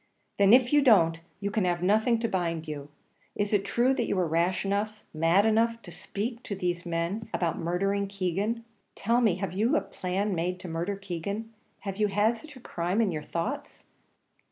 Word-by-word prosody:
"Then, 200 Hz, 0 st, +6 dB
if 250 Hz, +2 st, +6 dB
you 295 Hz, -, +6 dB
don't, 170 Hz, -, +5 dB, 0.2 s
you 200 Hz, 0 st, -2 dB
can 210 Hz, -1 st, +1 dB
have 175 Hz, -1 st, 0 dB
nothing 220 Hz, +5 st, +3 dB
to 230 Hz, -, +1 dB
bind 170 Hz, -5 st, -2 dB
you. 145 Hz, -2 st, -6 dB, 0.5 s
Is 205 Hz, +1 st, -1 dB
it 200 Hz, -1 st, +3 dB
true 240 Hz, +6 st, +2 dB
that 240 Hz, -3 st, -1 dB
you -, -, 0 dB
were 180 Hz, -2 st, +1 dB
rash 170 Hz, +5 st, +1 dB
enough, 210 Hz, +2 st, -1 dB
mad 165 Hz, +6 st, +3 dB
enough, 230 Hz, +1 st, +2 dB
to 175 Hz, -, -10 dB
speak 230 Hz, +7 st, -4 dB
to 205 Hz, -, -5 dB
these 175 Hz, -2 st, -2 dB
men 170 Hz, +6 st, -2 dB
about 170 Hz, -2 st, -1 dB
murdering 195 Hz, +4 st, 0 dB
Keegan? 200 Hz, +4 st, -2 dB, 0.3 s
Tell 235 Hz, +4 st, +2 dB
me; 215 Hz, -7 st, +3 dB
have 185 Hz, -2 st, -4 dB
you 215 Hz, +6 st, +2 dB
a -, -, +1 dB
plan 195 Hz, +1 st, -2 dB
made 180 Hz, +1 st, -1 dB
to -, -, -7 dB
murder 170 Hz, +4 st, -2 dB
Keegan? 200 Hz, +4 st, -5 dB, 0.3 s
Have 195 Hz, -2 st, -5 dB
you 210 Hz, -1 st, +3 dB
had 210 Hz, +3 st, +2 dB
such 300 Hz, -2 st, -13 dB
a -, -, -11 dB
crime 180 Hz, -3 st, -2 dB
in 220 Hz, -5 st, +3 dB
your 155 Hz, -2 st, -3 dB
thoughts?" 215 Hz, -, -4 dB
195 Hz, 200 wpm, -28 LUFS, 175-220 Hz, 0.5 s, Then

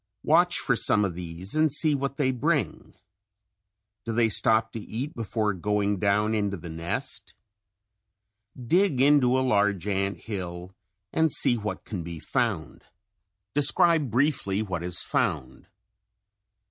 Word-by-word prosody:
Watch 175 Hz, +3 st, +3 dB
for 125 Hz, -, +2 dB
some 105 Hz, -2 st, +3 dB
of 95 Hz, -, -3 dB
these 90 Hz, +2 st, -6 dB
and 155 Hz, -1 st, +2 dB
see 150 Hz, +2 st, +3 dB
what 140 Hz, 0 st, -3 dB
they 130 Hz, -3 st, +1 dB
bring. 130 Hz, -, -2 dB, 1.1 s
Do 115 Hz, -, -4 dB
they 115 Hz, 0 st, +2 dB
stop 110 Hz, +1 st, +3 dB
to 115 Hz, -, -6 dB
eat 125 Hz, +8 st, -6 dB
before 110 Hz, -2 st, -2 dB
going 105 Hz, +1 st, -1 dB
down 105 Hz, +2 st, +1 dB
into 100 Hz, -2 st, -1 dB
the 85 Hz, -1 st, -9 dB
nest? 85 Hz, +1 st, -5 dB, 1.2 s
Dig 155 Hz, +4 st, +1 dB
into 135 Hz, -2 st, +4 dB
a 130 Hz, -, +1 dB
large 105 Hz, -4 st, +1 dB
ant 100 Hz, 0 st, -2 dB
hill 90 Hz, -3 st, -7 dB, 0.4 s
and 160 Hz, -1 st, +2 dB
see 120 Hz, -, +3 dB
what 110 Hz, -2 st, -5 dB
can 100 Hz, -6 st, -5 dB
be 85 Hz, 0 st, -7 dB
found. -, -, -3 dB, 0.7 s
Describe 145 Hz, +1 st, +3 dB
briefly 120 Hz, -5 st, 0 dB
what 90 Hz, -5 st, -4 dB
is 90 Hz, 0 st, -2 dB
found. -, -, -2 dB
110 Hz, 135 wpm, -26 LUFS, 100-135 Hz, 1.2 s, into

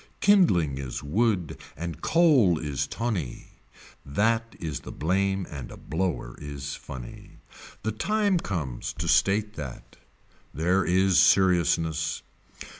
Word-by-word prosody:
Kindling 90 Hz, -, +4 dB
is 65 Hz, -3 st, -5 dB
wood 95 Hz, -, 0 dB, 0.2 s
and 85 Hz, -2 st, -5 dB
coal 140 Hz, -, +4 dB
is 75 Hz, -3 st, -2 dB
tonny. 105 Hz, -, -4 dB, 0.4 s
That 115 Hz, +10 st, 0 dB
is 80 Hz, -4 st, -4 dB
the -, -, -9 dB
blame 95 Hz, +3 st, 0 dB
and 70 Hz, -5 st, -7 dB
a -, -, -10 dB
blower 80 Hz, -7 st, -3 dB
is 70 Hz, -1 st, -6 dB
funny. 60 Hz, -2 st, -10 dB, 0.5 s
The 110 Hz, -, 0 dB
time 205 Hz, -, +1 dB
comes 75 Hz, -, -4 dB
to 80 Hz, +2 st, -4 dB
state 100 Hz, +6 st, +2 dB
that. 70 Hz, -5 st, -8 dB, 0.6 s
There 90 Hz, +5 st, +2 dB
is 95 Hz, +1 st, +3 dB
seriousness. 80 Hz, -4 st, +3 dB
90 Hz, 115 wpm, -26 LUFS, 75-105 Hz, 0.6 s, Kindling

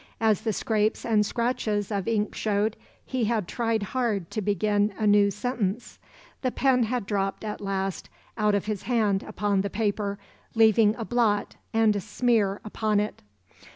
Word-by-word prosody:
As 220 Hz, -3 st, +2 dB
the 220 Hz, -, 0 dB
scrapes 215 Hz, +1 st, 0 dB
and 215 Hz, -2 st, +3 dB
scratches 215 Hz, -2 st, -1 dB
of 200 Hz, -1 st, -2 dB
ink 215 Hz, -2 st, 0 dB
showed, 210 Hz, +1 st, 0 dB, 0.3 s
he 255 Hz, -3 st, -1 dB
had 215 Hz, -4 st, 0 dB
tried 230 Hz, -1 st, -1 dB
hard 210 Hz, -5 st, -2 dB
to 215 Hz, -, -2 dB
begin 205 Hz, +1 st, +1 dB
a 215 Hz, -, -1 dB
new 205 Hz, -1 st, +5 dB
sentence. 215 Hz, 0 st, -3 dB, 0.4 s
The 255 Hz, -, +1 dB
pen 260 Hz, 0 st, +2 dB
had 245 Hz, -1 st, -2 dB
dropped 195 Hz, 0 st, -2 dB
at 210 Hz, -1 st, -5 dB
last 195 Hz, -1 st, -3 dB, 0.3 s
out 210 Hz, -2 st, +2 dB
of 200 Hz, -, -1 dB
his 210 Hz, -2 st, -3 dB
hand 215 Hz, -5 st, +1 dB
upon 205 Hz, -2 st, -1 dB
the 200 Hz, -, -2 dB
paper, 205 Hz, -1 st, -1 dB, 0.4 s
leaving 220 Hz, -1 st, +5 dB
a 225 Hz, -, -5 dB
blot 220 Hz, -4 st, +1 dB, 0.2 s
and 225 Hz, -2 st, +3 dB
a -, -, 0 dB
smear 210 Hz, -1 st, +1 dB
upon 215 Hz, 0 st, 0 dB
it. 210 Hz, +1 st, -3 dB
210 Hz, 165 wpm, -26 LUFS, 205-225 Hz, 0.4 s, new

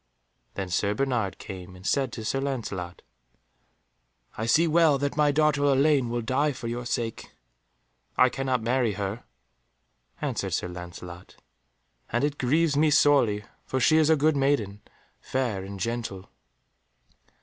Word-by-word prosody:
Then 95 Hz, -2 st, -4 dB
Sir 100 Hz, +3 st, 0 dB
Bernard 120 Hz, -6 st, -1 dB
came 90 Hz, -2 st, -9 dB
and 90 Hz, +1 st, -14 dB
said 135 Hz, 0 st, +1 dB
to 110 Hz, -, -6 dB
Sir 135 Hz, +5 st, -1 dB
Lancelot, 105 Hz, -10 st, -4 dB, 1.3 s
"I 110 Hz, -, -3 dB
see 160 Hz, +9 st, +4 dB
well 160 Hz, -2 st, +4 dB
that 140 Hz, +1 st, -2 dB
my 150 Hz, -1 st, +3 dB
daughter 150 Hz, -1 st, +2 dB
Elaine 140 Hz, -2 st, +3 dB
will 120 Hz, 0 st, -2 dB
die 140 Hz, +5 st, +1 dB
for 120 Hz, -, -7 dB
your 120 Hz, +1 st, -4 dB
sake." 115 Hz, -2 st, -3 dB, 0.9 s
"I 125 Hz, -, +6 dB
cannot 130 Hz, -2 st, -1 dB
marry 120 Hz, -2 st, +1 dB
her," 100 Hz, +3 st, -4 dB, 0.9 s
answered -, -, -2 dB
Sir 90 Hz, -, -3 dB
Lancelot, 90 Hz, 0 st, -9 dB, 0.8 s
"and 120 Hz, +3 st, 0 dB
it 145 Hz, 0 st, -1 dB
grieves 150 Hz, +4 st, +2 dB
me 155 Hz, +2 st, +4 dB
sorely, 135 Hz, -8 st, +4 dB, 0.2 s
for 130 Hz, -, -2 dB
she 155 Hz, +5 st, +4 dB
is 155 Hz, -1 st, +4 dB
a 160 Hz, -, +6 dB
good 155 Hz, +1 st, +2 dB
maiden, 135 Hz, -8 st, 0 dB, 0.4 s
fair 120 Hz, -8 st, -2 dB
and 100 Hz, 0 st, -8 dB
gentle." 115 Hz, -3 st, -4 dB
125 Hz, 145 wpm, -26 LUFS, 105-145 Hz, 1.3 s, I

